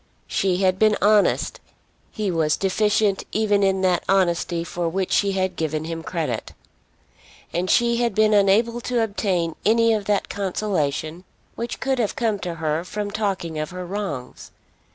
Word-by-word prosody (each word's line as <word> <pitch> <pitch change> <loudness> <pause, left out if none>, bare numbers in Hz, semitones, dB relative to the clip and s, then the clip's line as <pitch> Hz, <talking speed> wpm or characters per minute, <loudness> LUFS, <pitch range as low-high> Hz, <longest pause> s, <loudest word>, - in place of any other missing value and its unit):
She 185 - 0
had 185 0 +2
been 215 -1 +4
honest; 210 +1 +2 0.5
he 210 -4 -2
was 160 -2 +1
deficient 205 +1 +1
even 205 -2 +2
in 190 -1 +2
that 180 -2 +2
honesty 175 -3 +1
for 170 0 -3
which 190 +2 -2
she 200 -1 +2
had 190 -1 -1
given 155 -1 -2
him 165 0 -4
credit. 165 -1 -3 1.0
And 180 +2 -1
she 235 -1 +3
had 235 -4 0
been 215 0 +4
unable 215 +4 +3
to 240 -1 0
obtain 185 -6 -1
any 230 +1 +4
of 210 -2 -1
that 205 -1 0
consolation 180 -5 -2 0.3
which 235 +1 -5
could 265 -1 0
have 220 -4 0
come 225 -6 0
to 175 -3 -4
her 160 0 -1
from 205 +3 -4
talking 190 -7 -2
of 155 - -3
her 180 0 -6
wrongs. 175 -10 -5
195 Hz, 160 wpm, -23 LUFS, 170-215 Hz, 1.0 s, been